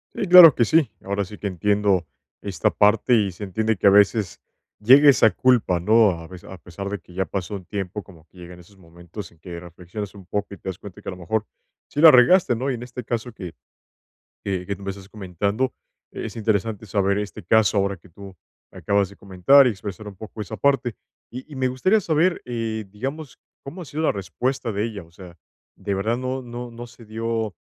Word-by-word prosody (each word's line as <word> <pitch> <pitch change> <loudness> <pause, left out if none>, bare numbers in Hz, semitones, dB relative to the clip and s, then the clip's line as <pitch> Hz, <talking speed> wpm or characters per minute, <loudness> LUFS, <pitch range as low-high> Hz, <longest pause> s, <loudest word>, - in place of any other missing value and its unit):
Sí, 200 - -2
claro 175 -5 +10
que 120 - +2
sí, 155 +3 +2
ahora 100 +1 -1
sí 105 +2 -10
que 105 - -4
entiendo 100 0 +1 0.4
esta 95 -6 -1
parte, 105 +4 +3
y 100 -4 +1
se 95 +4 -8
entiende 110 +3 -1
que 95 - +2
a - - +9
veces 100 -1 +3 0.4
llega 135 +7 +7
esa 110 -4 +5
culpa, 120 -9 +2
¿no?, 110 +4 +4
a 85 -1 -8
pes 90 0 -12
a 95 - -10
pesar 90 +3 -8
de 100 0 -4
que 90 +1 -19
ya 95 +2 -1
pasó 95 +1 -5
un 95 - -8
tiempo 100 +1 -5
como 80 -5 -18
que 90 - -24
llegan 90 0 -11
esos 100 +3 -19
momentos 85 +2 -11
en 85 - -25
que 85 +1 -9
reflexionas 90 +4 -8
un 100 -3 -14
poco 100 +2 -4
y - - -9
te - - -13
das 95 - -4
cuenta 100 -2 -12
que - - -16
a - - -2
lo 90 - -9
mejor 105 +5 -2 0.4
sí 145 - -3
la 160 -1 +10
regaste, 130 0 +5
¿no?, 130 +4 -2
y - - 0
en 120 -1 -6
este 125 0 -8
caso 120 +1 -3
que 90 -6 -9 0.9
que 95 -2 -3
que 100 - -3
tú - - -15
me 95 - -4
estás 95 0 -10
comentando, 100 +5 -2 0.4
eh, - - -5
es - - -9
interesante 110 -1 -1
saber 100 -1 0
este 105 -1 -6
caso 110 -2 +3
ahora 100 0 0
que 85 +2 -21
tú 95 +2 -12 0.3
acabas 100 -1 0
de 100 - -16
comentar 100 +9 +4
y - - +3
expresar 105 0 -7
un 100 - -11
poco 110 +2 -8
esa 110 +2 -8
parte, 135 -4 +1 0.4
y 130 +5 -9
y 145 - -9
me 130 -1 0
gustaría 185 +13 +2
saber, 170 0 +1
eh, 115 -3 -4
digamos, 135 +6 -6 0.3
¿cómo 150 +7 -8
ha 175 - -7
sido 155 +3 -4
la 160 - +2
respuesta 125 +5 -3
de 105 +2 -1
ella?, 105 -6 -6
o 80 - -22
sea, 85 0 -14 0.4
¿de 100 - -3
verdad 110 +5 -1
no 130 +1 -3
no 120 0 -8
no 120 +1 -9
se 115 -1 -16
dio, 110 -1 -3
105 Hz, 225 wpm, -22 LUFS, 95-120 Hz, 0.9 s, claro